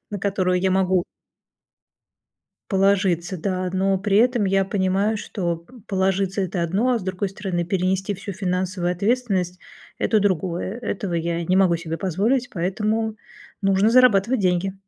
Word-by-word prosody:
на 205 - -4
которого 190 -2 0
я 185 +1 +1
могу 185 -1 +2 1.7
положиться, 190 -3 +2
да, 185 +1 -2
но 190 +1 +1
при 200 +1 +1
этом 240 -1 +3
я 195 0 +2
понимаю, 195 +2 0
что 175 -5 -3
п 170 +9 -20
положиться- 195 0 0
это 185 -1 -2
одно, 195 +9 +1
а 240 - +1
с - - -8
другой 185 +1 -2
стороны 185 -2 -3
перенести 190 +2 0
всю 200 +1 -7
финансовую 185 -1 -1
ответственность- 195 -2 0 0.4
это 220 - +2
другое. 185 +1 -1
Этого 200 -6 -3
я 170 0 -1
не 180 +3 +1
могу 185 -3 +4
себе 165 -1 -5
позволить, 210 +8 0
поэтому 215 +5 -1 0.5
нужно 195 +2 +3
зарабатывать 245 -1 +4
деньги. 185 +1 +1
190 Hz, 145 wpm, -22 LUFS, 180-205 Hz, 1.7 s, могу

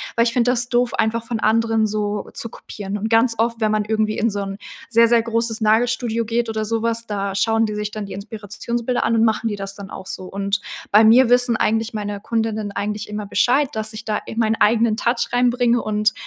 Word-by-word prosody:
weil 230 - +4
ich 230 - +1
finde 245 0 +2
das 245 0 0
doof, 245 0 +1
einfach 225 +1 0
von 230 -2 -3
anderen 225 0 +2
so 205 -1 -3
zu - - -4
kopieren 205 -2 -7
und 220 +2 -3
ganz 230 +1 +3
oft, 230 +1 0
wenn 215 -1 +1
man 215 0 +1
irgendwie 215 0 -1
in 230 - +1
so 205 -1 -4
'n 195 0 -6 0.3
sehr, 230 0 +5
sehr 235 -1 +4
großes 230 0 0
Nagelstudio 230 +1 +1
geht 230 +1 -1
oder 220 -1 -2
so 225 +1 -1
was, 230 0 0
da 200 -2 -3
schauen 225 +3 +2
die 210 - -4
sich 210 0 -3
dann 215 -1 -5
die 195 - -8
Inspirationsbilder 220 +4 -4
an 230 - +1
und 225 - +4
machen 225 +1 0
die 205 - -4
das 195 0 -5
dann 200 -1 -9
auch 190 - -9
so 185 - -5
und 200 +2 -2 0.3
bei 210 +2 +7
mir 235 +3 +6
wissen 245 -2 +3
eigentlich 225 +2 0
meine 205 -1 -4
Kundinnen 220 -1 -2
eigentlich 210 +1 -3
immer 210 0 -4
Bescheid, 260 +7 +2
dass 220 0 -1
ich 215 0 -8
da 215 -1 -1
in 225 - -7
meinen 220 -1 +2
eigenen 225 0 +3
Touch 235 0 0
reinbringe 245 -1 +2
und 215 0 0
220 Hz, 230 wpm, -20 LUFS, 210-230 Hz, 0.3 s, bei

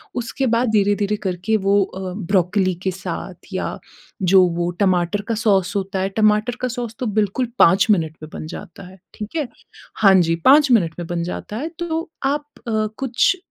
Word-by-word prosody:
उसके 245 +2 -2
बाद 235 0 +1
धीरे-धीरे 205 0 +2
करके 185 +4 0
वो 200 0 +2
अ, 185 -1 -6
ब्रोकोली 185 0 +1
के 190 - 0
साथ 190 +1 -7
या - - -3 0.5
जो 185 +1 +6
वो 175 0 0
टमाटर 185 +1 +2
का 230 - +1
सॉस 200 -3 +1
होता 195 0 -3
है 195 - 0
टमाटर 215 +2 +3
का 255 - 0
सॉस 240 -2 -5
तो 255 - -2
बिल्कुल 215 +5 0
5 185 +6 +5
मिनट 160 -5 0
में 155 - -8
बन 155 - -6
जाता 175 +4 -9
है, 190 0 -15 0.2
ठीक 215 +8 -8
है। 290 -5 -1 0.5
हाँ 195 -3 +5
जी, 165 -1 +2
5 270 - +5
मिनट 170 -9 +3
में 170 - -5
बन 170 -1 -2
जाता 205 +4 -5
है 310 +6 -3
तो 330 -2 -3
आप 290 +2 0 0.2
अ, 215 -1 0
कुछ 265 +7 +2
205 Hz, 185 wpm, -20 LUFS, 185-230 Hz, 0.5 s, जो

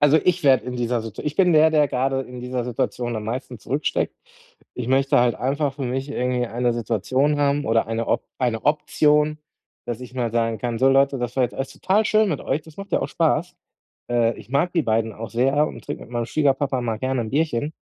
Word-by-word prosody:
Also, 145 +2 +5
ich 180 -2 +1
werde 130 -5 +5
in 125 0 -4
dieser 120 -1 -1
Situa 115 -2 -8
ich 150 - -2
bin 180 -2 +4
der, 155 0 +6
der 150 -2 +3
gerade 135 +1 0
in 125 -1 -9
dieser 125 0 -3
Situation 120 0 -2
am 110 - -4
meisten 125 +2 -5
zurücksteckt. 140 +8 -1 0.6
Ich 125 - -4
möchte 135 0 +3
halt 120 -1 +3
einfach 140 +2 -1
für 140 - -6
mich 130 +2 -2
irgendwie 125 -3 -1
eine 120 +1 0
Situation 120 +6 0
haben 145 0 +1
oder 115 0 +2
eine 115 0 -2
Op - - 0
eine 120 -4 -1
Option, 150 0 +2 0.5
dass 120 -1 -4
ich 125 0 -10
mal 120 -3 -1
sagen 115 -1 0
kann: 115 +1 -3
„So 130 +3 +4
Leute, 135 0 +3
das 120 0 -3
war 130 - +3
jetzt 125 - -1
alles 135 - -4
total 205 +4 +1
schön 215 0 +3
mit 155 -7 -2
euch. 145 +3 -2
Das 160 -1 -16
macht 195 0 -9
ja - - +3
auch - - -2
Spaß.“ 170 +2 0 0.5
Äh, 120 -1 +2
ich - - -13
mag 145 +6 +1
die 165 - +2
beiden 110 -2 0
auch 115 +1 -7
sehr 135 +5 +2
und - - -9
trinke - - -5
mit - - -17
meinem 120 -1 -1
Schwiegerpapa 140 -1 +1
mal 115 -3 -2
gerne 130 +1 -1
'n 110 - -5
Bierchen, 150 -1 0
130 Hz, 230 wpm, -23 LUFS, 120-145 Hz, 0.6 s, der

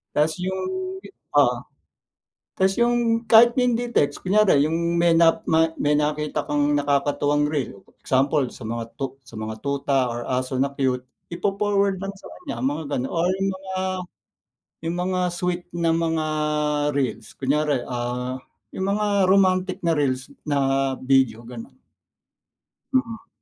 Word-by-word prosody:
Tas 155 +2 +3
yung 190 0 -2 0.4
gi - - -11 0.3
oo. - - +5 1.0
Tas 190 0 +3
yung 235 -1 +1
kahit 235 +1 +8
hindi 240 -1 0
text, 145 +4 +1
kunyari 190 -7 +4
yung 170 +2 0
may 170 0 +4
nap 165 0 +4
mat 160 0 +2
may 145 - +1
nakita 150 0 0
kang 145 0 +1
nakakatuwang 145 0 +1
reel. 125 -9 -3 0.2
Example, 135 0 +1
sa 120 - -11
mga 115 +1 -3
tut 135 -2 -3 0.2
mga 110 0 -6
tuta 140 -1 0
or 120 0 -4
aso 130 +1 -2
na 140 +2 0
cute. 130 -2 -1 0.2
Ipo-forward 200 +1 0
lang 195 0 -5
sa - - -15
kanya 320 - -6
mga 270 - -1
ganoon 130 +1 -3
or 175 +1 +1 0.2
mga 190 0 -7 1.1
yung 170 +1 -1
mga 180 +1 -1
sweet 180 0 -2
na 165 -1 +1
mga 165 -1 0 0.7
reels. 135 -2 -2
Kunyari, 140 -1 0
ah, 125 +1 -3 0.3
yung 190 - -3
mga 210 +1 0 0.2
romantic 185 -1 +3
na 170 - +3
reels 130 -3 -1 0.2
na 135 -2 +1
video, 130 -4 +2
ganon. 120 - -10 1.2
Mm. 230 -3 -1
150 Hz, 140 wpm, -23 LUFS, 135-190 Hz, 1.2 s, kahit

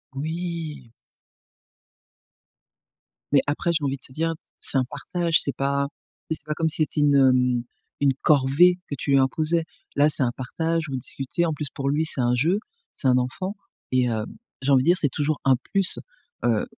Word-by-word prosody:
Oui. 160 -4 -4 2.4
Mais 140 - +6
après, 150 +4 0
j'ai 155 -3 0
envie 135 0 -1
de - - -37
te 130 - -16
dire, 165 +2 0 0.3
c'est 135 - -2
un 130 - +2
partage, 165 +4 0
c'est 140 - -3
pas 140 0 +1 0.4
tu 160 - 0
sais - - -7
c'est - - -32
pas 150 - 0
comme 160 -1 +1
si - - -4
c'était 150 0 -2
une, 145 -1 +4
hem, 125 -2 +4 0.4
une 140 -2 +3
corvée 150 +6 +5
que 145 - -2
tu 140 - -2
lui 135 - +6
imposais. 155 +5 +1 0.3
Là, 145 +1 +5
c'est 140 - -1
un 120 - +1
partage 160 +5 -1
ou - - -5
vous - - -1
discutez, 135 +7 -3
en 160 - 0
plus 150 -2 -4
pour 140 0 -2
lui 155 +3 +1
c'est 135 - -2
un 120 0 +2
jeu, 170 +11 +2 0.4
c'est 135 - -1
un 125 - +4
enfant 185 +11 -2 0.4
et 130 -1 +3
hem, 110 -2 -1 0.4
j'ai 140 +2 +1
envie 130 -1 +5
dire 175 +2 +4
c'est 145 - +2
toujours 145 +3 -1
un 135 -1 +6 0.2
plus. 195 -2 +4 0.5
Heu, - - +2
145 Hz, 195 wpm, -24 LUFS, 130-160 Hz, 2.4 s, Mais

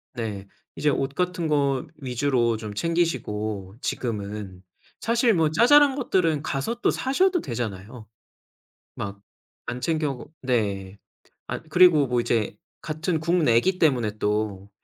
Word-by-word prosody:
네. 105 -5 -5 0.3
이제 150 - +1
옷 135 0 -1
같은 180 0 -1
거 140 -1 +1
위주로 125 -4 0
좀 110 -1 -7
챙기시고 110 - -2
지금은 105 -5 -4 0.4
사실 235 0 +3
뭐 160 -3 +2
자잘한 275 - +6
것들은 180 - +1
가서 140 +11 -2
또 - - +3
사셔도 355 +7 +1
되잖아요 110 0 -5 0.9
막 100 0 -5 0.5
안 120 +1 -4
챙겨 155 +1 0
오고 135 +3 -8
네 100 -6 -1 0.5
아 - - -3
그리고 160 -2 +5
뭐 125 -1 +1
이제 115 -3 0 0.2
같은 155 +2 -2
국내기 170 0 +2
때문에 120 - +1
또 105 -2 -2
130 Hz, 245 characters per minute, -25 LUFS, 105-165 Hz, 0.9 s, 자잘한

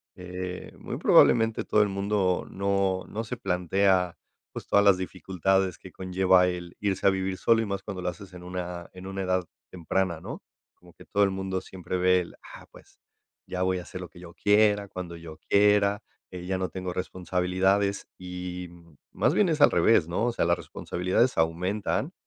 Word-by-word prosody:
eh, 90 0 -6
muy - - -5
probablemente 115 -2 +4
todo 105 - +3
el 105 - +2
mundo 100 -2 0
no 100 -1 0
no 110 +2 -4
se 125 +3 -4
plantea, 90 -1 +1 0.4
pues, - - -7
todas 100 0 +3
las 100 -2 +6
dificultades 95 0 -1
que 95 - -13
conlleva 95 0 +3
el 90 -1 -5
irse 100 -2 -1
a - - +8
vivir 95 0 -1
solo 115 -1 +3
y 110 - -1
más 100 -1 -4
cuando 95 -3 -6
lo 90 - -4
haces 95 +2 -10
en 90 0 -10
una 90 -1 -6
en 90 0 -10
una 95 0 -4
edad 90 0 +1 0.3
temprana, 90 -1 -2
¿no?, - - -7 0.3
como 90 -1 -20
que - - -15
todo 100 0 +2
el 100 - 0
mundo 95 0 -3
siempre 90 -1 -5
ve 90 0 +4
el: 85 - -10 0.2
"Ah, - - -13
pues, - - -18 0.5
ya 90 - -4
voy 95 -1 +1
a - - -6
hacer 90 +1 -8
lo 90 - -6
que 85 - -16
yo 85 -1 -11
quiera, 105 -1 +3
cuando 90 -3 -7
yo 80 -2 -10
quiera, 100 0 +4 0.3
eh, 90 -1 -7
ya 95 0 -1
no 95 0 -2
tengo 90 -1 -5
responsabilidades", 95 +2 0
y 90 -1 -6 0.4
más - - +1
bien 200 -5 +3
es 155 -1 0
al - - +7
revés, 90 -8 +4
¿no?, 90 +8 0
o - - +1
sea, 115 - 0
las 85 0 +2
responsabilidades 90 +8 -1
aumentan 90 - 0
95 Hz, 190 wpm, -27 LUFS, 90-100 Hz, 0.5 s, a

